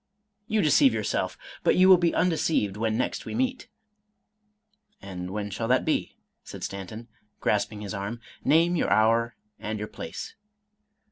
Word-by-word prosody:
" 210 - -52
You 215 -3 +1
deceive 260 - +5
yourself, - - -1 0.3
but - - +4
you 185 +1 +6
will 185 -2 +8
be 170 -1 +1
undeceived 160 - +1
when 110 0 -1
next 125 - -2
we - - -4
meet." 260 +1 -1 0.5
— 210 +1 -48
" 215 -1 -45
And 90 -2 -7
when 105 +1 -4
shall 115 +3 -3
that 130 +1 +2
be?" - - -1 0.3
said - - -9
Stanton, 100 +4 -6 0.3
grasping 105 0 0
his 100 -2 -5
arm; 100 +4 -4 0.2
"name 170 +3 +4
your - - 0
hour 115 +2 +3 0.2
and 110 +1 -4
your 105 +1 -4
place." 80 - -7
115 Hz, 165 wpm, -26 LUFS, -, 0.5 s, will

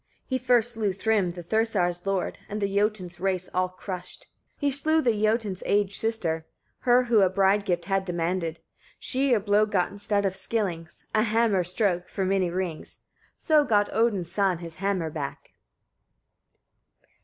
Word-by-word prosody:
He 260 -1 -1
first 245 -2 +3
slew 215 -4 -1
Thrym, 200 -3 +1
the 175 0 -8
Thursar's 190 -3 0
lord, 195 -2 -1
and 210 - -3
the 200 -1 -2
Jotun's 200 -4 -1
race 185 -1 -1
all 185 0 +1
crushed; 180 -1 -7 0.4
33. 285 - 0
He - - +2
slew 310 +4 +2
the 235 -8 +1
Jotun's 215 -3 0
aged 200 -1 +1
sister, 175 -8 -1 0.3
her 250 0 +4
who 235 -4 +3
a 190 - +5
bride 195 +2 +2
gift 180 -4 -1
had 195 -1 0
demanded; 170 -2 -2 0.4
she 270 +1 0
a - - +2
blow 205 +1 +2
got 190 -4 0
instead 205 0 -1
of 190 -1 0
skillings, 190 -5 -3
a 215 - +3
hammer's 215 -5 +2
stroke 180 -3 0
for 190 - -2
many 190 -1 +1
rings. 175 -2 -4 0.4
So 310 -3 +3
got 205 -6 +1
Odin's 205 -6 +1
son 190 -1 +1
his 165 -1 -9
hammer 185 -4 -1
back. 145 -3 -6
195 Hz, 165 wpm, -26 LUFS, 180-220 Hz, 0.4 s, a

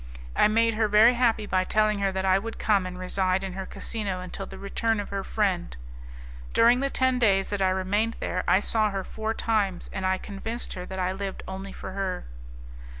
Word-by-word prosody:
I - - +5
made 225 +1 +3
her 220 0 +1
very 215 +4 +6
happy 235 -3 +2
by 185 -2 +1
telling 215 +1 +2
her 195 -1 +1
that 190 0 -2
I 190 0 +4
would 225 +3 -6
come 200 -4 +2
and 180 0 -7
reside 185 +1 0
in 190 -1 -4
her 190 0 -5
casino 200 -5 -4
until 185 +1 -6
the 190 - -9
return 220 +3 -1
of 205 - -5
her 195 -1 -3
friend. 190 - -1 0.8
During 235 +2 +6
the 275 +1 0
ten 260 -1 +1
days 195 -5 +3
that 205 -1 -1
I 190 - +4
remained 200 +5 0
there, 180 - -2
I 190 - +4
saw 215 0 +2
her 195 -1 -3
four 220 +2 -3
times, 205 -5 -1
and 190 - -4
I 190 0 +2
convinced 225 +5 -6
her 180 -1 -6
that 190 - -6
I 185 0 0
lived 195 0 -5
only 195 +1 -6
for - - -7
her. 190 -1 -3
195 Hz, 210 wpm, -26 LUFS, 190-220 Hz, 0.8 s, very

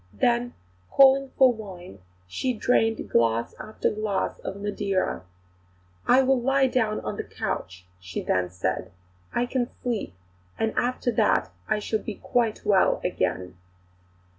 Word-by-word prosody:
Then, 240 0 +1 0.3
calling 275 0 +6
for 260 -2 +6
wine, 185 - -10 0.3
she 250 - -2
drained 225 -1 +1
glass 115 0 +1
after 215 - -2
glass 210 -2 -2
of - - -5
Madeira. 200 -2 -1 0.9
"I 260 +2 +6
will 260 -1 +2
lie 270 +2 +3
down 225 -5 0
on - - -4
the - - -3
couch," 90 0 -5
she 90 0 -5
then 90 -1 0
said. 90 0 -3 0.4
"I 240 - +1
can 245 -1 -1
sleep, 220 - -2 0.4
and 225 0 0
after 245 0 0
that 210 - +2 0.2
I - - +1
shall 215 +1 -1
be 215 - -5
quite 230 -4 -1
well 200 -2 +4
again." 90 - -2
215 Hz, 140 wpm, -26 LUFS, -, 0.9 s, calling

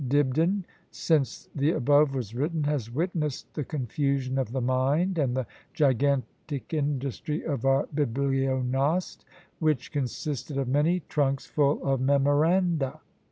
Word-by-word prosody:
Dibdin, 145 +8 +2 0.3
since 145 -7 0
the 145 +3 +1
above 145 +2 +3
was 120 -5 -4
written, 150 +5 -1
has 145 -6 -1
witnessed 150 +1 -2
the 150 - -2
confusion 135 -1 -1
of 130 -4 -2
the 130 - -1
mind 135 +8 +1
and 130 -3 +1
the 130 - -1 0.3
gigantic 140 0 0
industry 145 0 -2
of 135 -5 -2
our 135 0 +3
bibliognoste, 135 +3 0 0.4
which 155 -5 0
consisted 145 +1 -3
of 135 -2 -1
many 150 +7 +2
trunks 140 -3 0
full 145 -1 +1
of 135 -2 +1
memoranda. 145 +3 +2
140 Hz, 125 wpm, -27 LUFS, 130-150 Hz, 0.4 s, above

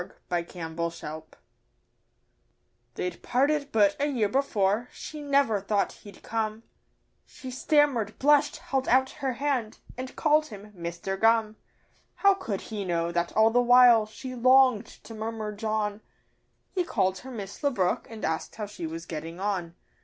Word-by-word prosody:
MARY 175 -1 0
CALLED - - -17 0.2
HIM - - -12
'MISTER' 165 -2 -4 1.7
They'd 180 - -4
parted 285 +3 +1
but 205 -2 +4
a 290 - +1
year 235 -8 0
before 230 -4 +1
she 305 -1 -8
never 275 -8 +2
thought 200 0 0
he'd 205 -2 -15
come, 220 0 -3 0.6
She 260 -2 -9
stammer'd, 255 -5 +2
blushed, 295 +1 +3
held 265 -1 -2
out 260 +2 +3
her 270 -3 -3
hand, 255 -4 -2 0.2
and 255 +1 -7
called 305 0 +3
him 210 -1 -11
'Mister 170 +2 -5
Gum.' 225 0 +3 0.6
How 395 -1 +5
could 230 - -4
he 210 -3 -5
know 170 -2 -1
that 170 0 -1
all 220 +1 +5
the 245 +2 +4
while 245 -3 +6
she 255 +4 -8
longed 255 -2 +4
to 230 - -13
murmur 220 -1 -4
'John.' 215 0 -2 0.7
He 365 - 0
called 190 - 0
her 265 - -10
'Miss 205 -6 -7
le 285 - +3
Brook,' 190 -9 -1
and 225 -1 -5
asked 160 0 -3
how 215 - -4
she 200 -5 -6
was 165 +1 -7
getting 165 +2 -6
on. 185 -4 -2
220 Hz, 160 wpm, -27 LUFS, 195-260 Hz, 1.7 s, while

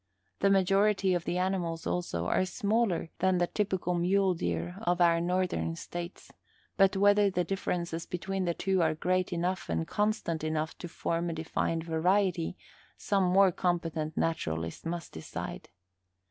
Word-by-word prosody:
The 195 - +3
majority 195 0 +3
of 175 -1 -1
the 175 - -1
animals 180 -3 -1
also 85 - -2
are 135 - +2
smaller 200 -3 0
than 185 0 +3
the 175 - +3
typical 190 -2 -1
mule 185 +2 +2
deer 85 - -3
of 175 0 +1
our 170 -1 +4
Northern 175 - 0
States, 175 - -7 0.4
but 195 0 +4
whether 205 +1 +5
the 180 -2 0
differences 170 -2 -3
between 190 +2 -2
the 170 -1 0
two 190 -1 +1
are 160 -1 +2
great 185 +3 0
enough 175 - -2
and 80 -1 -1
constant 205 -7 -1
enough 155 0 -1
to 175 - -6
form 170 +1 -2
a - - -2
defined 160 0 -2
variety, 175 +1 +1 0.4
some 195 -2 +1
more 190 +1 +5
competent 165 -3 -1
naturalist 80 - -2
must 170 -1 -4
decide. 80 - -7
175 Hz, 150 wpm, -30 LUFS, 165-190 Hz, 0.4 s, whether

